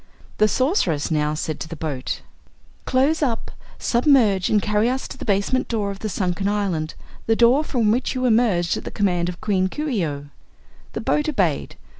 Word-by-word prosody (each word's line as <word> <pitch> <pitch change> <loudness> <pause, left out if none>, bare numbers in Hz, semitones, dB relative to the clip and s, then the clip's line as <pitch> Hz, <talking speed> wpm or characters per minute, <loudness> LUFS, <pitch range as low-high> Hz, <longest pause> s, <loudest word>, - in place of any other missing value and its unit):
The 215 - +5
Sorceress 210 - +1
now 150 -1 +1
said 155 0 -3
to - - -5
the 165 - -7
boat: 150 -5 -4 0.6
"Close 275 +5 +2
up, 240 -6 -1 0.3
submerge 235 -7 +3
and 210 - +4
carry 210 +3 +1
us 260 +1 -2
to - - -9
the - - -8
basement 200 +5 +1
door 210 -4 -1
of 195 - -8
the 215 - -3
sunken 185 +1 -1
island 195 -7 -1 0.3
the 225 - +3
door 240 +6 +4
from 235 -8 +1
which 250 +3 0
you 255 0 -1
emerged 220 -8 +2
at - - -7
the - - -5
command 180 -4 0
of 175 - -7
Queen 195 -4 +1
Coo 300 +11 -4
ee 230 - 0
oh." 145 -2 -4 0.7
The - - -3
boat 300 +1 +1
obeyed. 185 - 0
210 Hz, 190 wpm, -22 LUFS, 175-245 Hz, 0.7 s, The